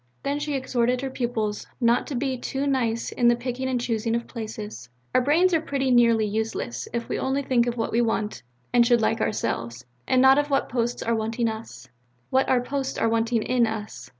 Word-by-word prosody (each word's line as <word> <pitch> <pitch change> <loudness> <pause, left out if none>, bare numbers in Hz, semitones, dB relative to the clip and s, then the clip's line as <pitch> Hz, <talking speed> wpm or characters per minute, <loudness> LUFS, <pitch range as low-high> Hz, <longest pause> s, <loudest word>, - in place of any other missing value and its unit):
Then 285 +1 -1
she 295 -1 -2
exhorted 250 -1 0
her 270 -1 -3
pupils 225 -5 -2
not 235 -1 +2
to 285 - -4
be 260 +1 -1
too 270 +2 -3
nice 235 -5 0
in 240 - +2
the 240 - +5
picking 250 +2 -3
and 255 -1 0
choosing 230 -1 -1
of 235 - -2
places. 215 - -7 0.2
"Our - - +4
brains 330 +8 +3
are 325 - +3
pretty 275 -4 -1
nearly 230 -3 +4
useless, 210 - -3
if 235 0 -3
we - - -2
only 270 +1 0
think 245 -3 +2
of 240 0 -2
what 225 - -1
we 235 - +2
want 215 -2 -1 0.3
and 240 -1 +6
should 240 0 +4
like 225 +1 +1
ourselves; 115 - -2 0.2
and 255 - +3
not 265 +2 +7
of 290 0 -1
what 275 - +1
posts 240 0 -1
are 230 - 0
wanting 225 +1 -1
us, 220 - -7 0.4
what 265 +1 +2
our 250 -1 +3
posts 270 +1 -3
are 225 - +2
wanting 225 0 +1
in 245 -2 +2
us. 210 - -6
240 Hz, 210 wpm, -25 LUFS, 225-260 Hz, 0.4 s, not